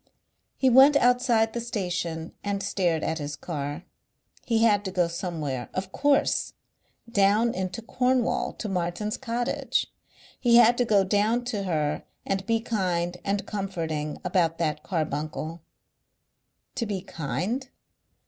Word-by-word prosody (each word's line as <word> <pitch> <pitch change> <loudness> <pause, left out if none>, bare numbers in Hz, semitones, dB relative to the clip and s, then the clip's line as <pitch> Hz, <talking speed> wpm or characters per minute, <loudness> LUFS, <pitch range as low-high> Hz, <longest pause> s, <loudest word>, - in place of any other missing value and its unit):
He 265 - +2
went 265 +3 +7
outside 245 -3 +3
the 235 - -2
station 180 -7 -3
and 200 -1 -2
stared 175 -5 0
at 160 - -1
his 145 0 -4
car. 145 0 -5 0.6
He 225 -1 +3
had 205 -3 +4
to 190 - -2
go 180 -2 +2
somewhere. 160 -7 -4
Of 185 0 -3
course! 285 +4 +2 0.5
down 215 +1 +3
into 185 +4 -4
Cornwall 250 +1 +1
to 220 - -5
Martin's 190 +3 -2
cottage. 240 -1 -1 0.5
He 240 -2 +4
had 240 0 +7
to 245 - +3
go 205 -4 +4
down 215 +5 +1
to 210 -5 -2
her 150 -4 -1 0.2
and 195 0 -1
be 230 -1 +2
kind 180 -6 -1
and 200 0 -1
comforting 165 -7 -3
about 175 -2 +1
that 160 -3 -1
carbuncle. 155 0 -3 1.1
To 235 -3 -2
be 195 -3 -3
kind?... 205 - -3
195 Hz, 135 wpm, -26 LUFS, 170-230 Hz, 1.1 s, went